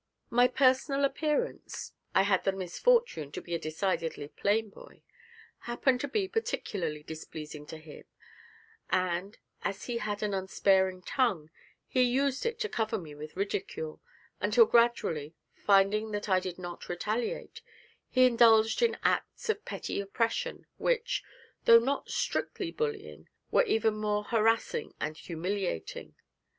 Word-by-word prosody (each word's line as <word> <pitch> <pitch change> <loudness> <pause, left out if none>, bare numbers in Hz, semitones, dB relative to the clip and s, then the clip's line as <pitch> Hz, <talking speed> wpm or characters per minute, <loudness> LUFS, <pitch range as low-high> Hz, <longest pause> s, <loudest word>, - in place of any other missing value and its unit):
My 245 +1 +5
personal 265 +2 +3
appearance 300 - -2 0.2
I - - +6
had 195 -2 +2
the 195 - +2
misfortune 190 - +1
to - - -4
be 175 - -7
a 170 - 0
decidedly 160 -2 -2
plain 210 +4 0
boy - - -15 0.7
happened 250 +1 +2
to 285 - -2
be 385 +7 0
particularly 190 - -2
displeasing 155 -1 -8
to 160 - -7
him, 155 -1 -12 0.8
and, 185 +2 0 0.2
as 200 - -3
he 235 -1 -2
had 210 -1 -3
an 210 -1 -1
unsparing 190 -1 +2
tongue, 190 - 0 0.4
he 255 - +2
used 265 - +2
it 460 -1 -2
to 435 - +1
cover 225 - -1
me 160 -5 -8
with 150 +1 -9
ridicule, 190 -5 -3 0.4
until 465 - +5
gradually, 170 - +2 0.2
finding 205 +2 +3
that 205 0 -3
I 185 -2 +4
did 185 -1 -5
not 175 -1 -8
retaliate, 215 - -3 0.5
he 255 0 +5
indulged 225 - +5
in 470 -1 +3
acts - - 0
of 435 -1 0
petty - - -3
oppression 225 +3 -2
which, - - 0 0.4
though 230 - +10
not 265 +5 0
strictly 355 -4 -2
bullying, 445 -1 -4 0.2
were - - +5
even 220 - +1
more 210 -1 0
harassing 225 +1 +1
and 155 +1 -3
humiliating. 175 - -4
210 Hz, 140 wpm, -30 LUFS, 180-255 Hz, 0.8 s, though